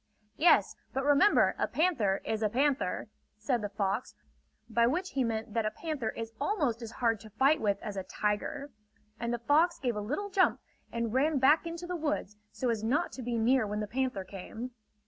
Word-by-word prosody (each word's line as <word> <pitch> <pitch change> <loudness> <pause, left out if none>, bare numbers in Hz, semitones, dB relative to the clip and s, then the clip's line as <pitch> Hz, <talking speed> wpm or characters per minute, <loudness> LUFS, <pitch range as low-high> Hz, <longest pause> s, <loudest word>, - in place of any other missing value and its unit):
"Yes, 340 - +4 0.2
but 270 - -1
remember 290 +8 +5
a - - +1
panther 250 - +1
is 220 0 -1
a 215 - +2
panther!" 265 -4 0 0.3
said 235 +2 0
the 205 - -3
fox; 200 +3 -2 0.5
by 235 0 +3
which 360 +8 -1
he 270 - +1
meant 220 -2 -3
that 230 - +1
a - - +2
panther 275 -1 -3
is 225 0 -6
almost 285 - 0
as 230 - -6
hard 230 -4 +1
to 215 - -12
fight 275 +8 +3
with 200 -2 +1
as 210 -3 -5
a 195 - -2
tiger. 210 +9 -2 0.5
And 235 0 -2
the 240 - 0
fox 300 +8 +3
gave 245 -4 -1
a 210 - -2
little 300 - -3
jump 375 -1 +3 0.3
and 230 -1 -2
ran 290 +3 +2
back 295 +6 +4
into 335 +1 -5
the 360 0 -3
woods, 295 - -2 0.2
so 255 - -2
as 220 -2 -2
not 285 +10 +1
to 265 - -7
be 240 -1 -2
near 230 0 +3
when 210 +1 -2
the 210 - -1
panther 250 -3 -2
came. 205 +6 -7
240 Hz, 205 wpm, -30 LUFS, 215-290 Hz, 0.5 s, remember